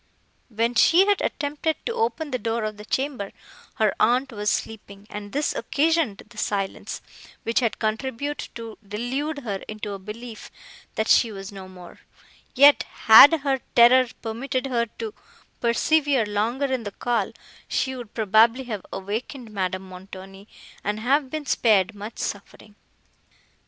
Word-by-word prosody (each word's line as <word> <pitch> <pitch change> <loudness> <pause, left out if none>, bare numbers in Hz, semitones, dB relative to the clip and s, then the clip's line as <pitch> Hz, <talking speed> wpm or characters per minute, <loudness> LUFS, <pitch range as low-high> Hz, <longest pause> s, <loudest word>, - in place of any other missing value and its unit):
When 230 +1 0
she 335 +10 +5
had 410 -1 +2
attempted 300 +2 -1
to 465 - -1
open 450 -10 -1
the 255 - -1
door 230 -1 -2
of 215 -1 -4
the 210 - -10
chamber, 260 -5 -2 0.4
her 215 -3 +2
aunt 255 +3 +2
was 210 -2 -1
sleeping, 205 -3 -4
and 205 0 -7
this 290 +2 0
occasioned 310 -8 0
the 225 -1 -11
silence, 195 -2 -3 0.4
which 230 - +1
had 230 -4 0
contributed 260 +6 -3
to 230 -2 -8
delude 260 +9 -3
her 205 -4 -2
into 215 -1 -6
a 195 - -6
belief, 220 +3 -9 0.5
that 220 - -1
she 230 - +4
was 195 0 -8
no 195 -1 -9
more; 180 -2 -13 0.6
yet 285 +2 +7
had 285 +8 +7
her 275 -2 0 0.2
terror 250 +2 +7 0.2
permitted 255 +4 -3
her 235 -3 0
to 445 -2 -5 0.5
persevere 275 +1 +2
longer 220 +7 -1
in 260 -2 -1
the 210 - -5
call, 235 -5 -1 0.4
she 260 0 -1
would 240 -4 -9
probably 225 +4 +4
have 215 -6 -5
awakened 220 +5 -5
Madame 185 -1 -3
Montoni, 190 +1 -11 0.4
and 210 +1 -2
have 270 +4 +1
been 310 +1 -5
spared 215 -6 +3
much 210 +2 -8
suffering. 205 +1 -6
230 Hz, 150 wpm, -24 LUFS, 210-270 Hz, 0.6 s, yet